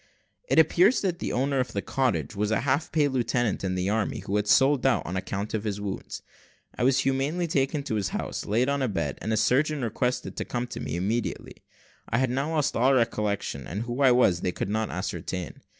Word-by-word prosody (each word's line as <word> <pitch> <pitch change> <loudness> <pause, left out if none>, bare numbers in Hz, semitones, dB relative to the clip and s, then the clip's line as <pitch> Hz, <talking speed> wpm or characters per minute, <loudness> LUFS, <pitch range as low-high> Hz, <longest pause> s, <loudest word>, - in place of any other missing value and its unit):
It - - +2
appears 175 - +5
that 180 -3 -1
the - - -3
owner 135 +2 0
of 125 -2 -2
the 100 - -1
cottage 130 -4 -1
was 105 +1 0
a 110 - +1
half 140 +3 0
pay 150 -2 +3
lieutenant 120 -5 0
in 95 -1 -1
the 95 +2 0
army, 110 -1 -1
who 100 - -3
had 105 0 0
sold 135 +4 +4
out 135 -2 +2
on 90 - -4
account 100 +2 -3
of 110 -2 -1
his 105 -2 -3
wounds. 100 -2 -5 0.5
I - - -2
was 130 +1 +4
humanely 140 +6 0
taken 145 -2 0
into 140 - -4
his 100 -3 0
house, - - -4
laid 115 +5 +2
on 140 0 0
a 130 - +1
bed, 80 - -2
and 110 - -2
a 110 - +1
surgeon 140 +6 +2
requested 125 +3 -2
to - - -1
come 120 0 -3
to - - -6
me - - -4
immediately. 105 +7 -2 0.5
I 115 - +1
had 130 0 +1
now 140 +5 -1
lost 150 -1 +1
all 130 +3 +4
recollection, 105 - -1
and 100 +5 -3
who 120 +3 -4
I 130 -2 +6
was 105 -8 +3
they 90 - 0
could 90 - -4
not 110 +1 -1
ascertain. 90 -2 -4
120 Hz, 225 wpm, -26 LUFS, 100-135 Hz, 0.5 s, I